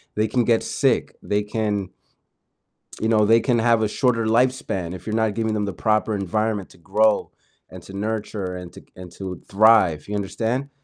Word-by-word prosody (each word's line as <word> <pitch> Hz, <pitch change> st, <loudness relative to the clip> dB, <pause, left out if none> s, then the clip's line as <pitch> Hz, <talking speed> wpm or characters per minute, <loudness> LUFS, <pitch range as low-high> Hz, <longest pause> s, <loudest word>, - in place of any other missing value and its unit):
they 110 Hz, +1 st, +1 dB
can 120 Hz, +2 st, +1 dB
get 115 Hz, -2 st, +2 dB
sick, -, -, 0 dB
they 105 Hz, 0 st, 0 dB
can 105 Hz, -3 st, -2 dB, 1.1 s
you 110 Hz, -, 0 dB
know, 110 Hz, -2 st, +4 dB
they 115 Hz, +2 st, +5 dB
can 120 Hz, -1 st, +1 dB
have 115 Hz, -1 st, +3 dB
a 105 Hz, -, +1 dB
shorter 115 Hz, -2 st, +1 dB
lifespan 115 Hz, -7 st, 0 dB
if 90 Hz, +2 st, -10 dB
you're 110 Hz, -, -2 dB
not 110 Hz, -2 st, +1 dB
giving 110 Hz, -1 st, -1 dB
them 105 Hz, -1 st, -1 dB
the 100 Hz, -, -3 dB
proper 110 Hz, +4 st, 0 dB
environment 105 Hz, +1 st, -2 dB
to -, -, -18 dB
grow, 105 Hz, +4 st, +1 dB, 0.4 s
and 90 Hz, -1 st, -10 dB
to 95 Hz, -, -12 dB
nurture, 105 Hz, -2 st, -3 dB
and 90 Hz, -1 st, -9 dB
to -, -, -12 dB
c -, -, -23 dB
and 90 Hz, -1 st, -10 dB
to 95 Hz, 0 st, -6 dB
thrive, 100 Hz, -7 st, +4 dB
you 105 Hz, -, -2 dB
understand? 115 Hz, +7 st, -2 dB
110 Hz, 195 wpm, -22 LUFS, 95-110 Hz, 1.1 s, they